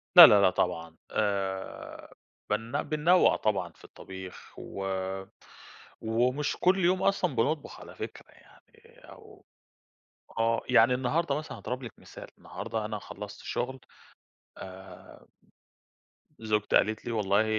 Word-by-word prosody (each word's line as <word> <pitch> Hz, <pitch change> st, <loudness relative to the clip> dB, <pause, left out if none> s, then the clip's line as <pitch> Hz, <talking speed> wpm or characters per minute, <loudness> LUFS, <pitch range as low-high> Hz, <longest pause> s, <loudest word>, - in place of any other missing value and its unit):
لأ، -, -, +14 dB
لأ، 105 Hz, -, +6 dB
لأ 95 Hz, -, +6 dB
طبعًا 85 Hz, -3 st, -2 dB, 0.2 s
آآ 95 Hz, -2 st, -3 dB, 0.4 s
بن 115 Hz, +7 st, -1 dB
بننوّع 165 Hz, +4 st, +4 dB
طبعًا 95 Hz, -5 st, -1 dB
في -, -, -22 dB
الطبيخ، 95 Hz, -1 st, -11 dB
و 95 Hz, -, -6 dB, 1.2 s
ومش 125 Hz, +6 st, 0 dB
كُلّ 185 Hz, 0 st, +3 dB
يوم 185 Hz, +1 st, +2 dB
أصلًا 180 Hz, -7 st, +1 dB
بنطبُخ 140 Hz, +6 st, -1 dB
على -, -, -12 dB
فكرة، -, -, -8 dB
يعني -, -, -22 dB
أو -, -, -15 dB, 0.9 s
آه، 115 Hz, 0 st, +2 dB
يعني 125 Hz, 0 st, +5 dB
النهارده 140 Hz, +4 st, 0 dB
مثلًا 155 Hz, -, -7 dB
هاضرب 125 Hz, +1 st, -5 dB
لِك 120 Hz, -, -7 dB
مثال، -, -, -11 dB
النهارده 110 Hz, -1 st, -5 dB
أنا 105 Hz, 0 st, -3 dB
خلّصت -, -, -9 dB
شُغل 130 Hz, +2 st, -3 dB, 0.8 s
آمم، 95 Hz, -1 st, -12 dB, 1.1 s
زوجتي 105 Hz, -2 st, 0 dB
قالت 110 Hz, +1 st, +2 dB
لي 120 Hz, -, -3 dB
والله 105 Hz, -1 st, +2 dB
115 Hz, 125 wpm, -29 LUFS, 100-135 Hz, 1.2 s, لأ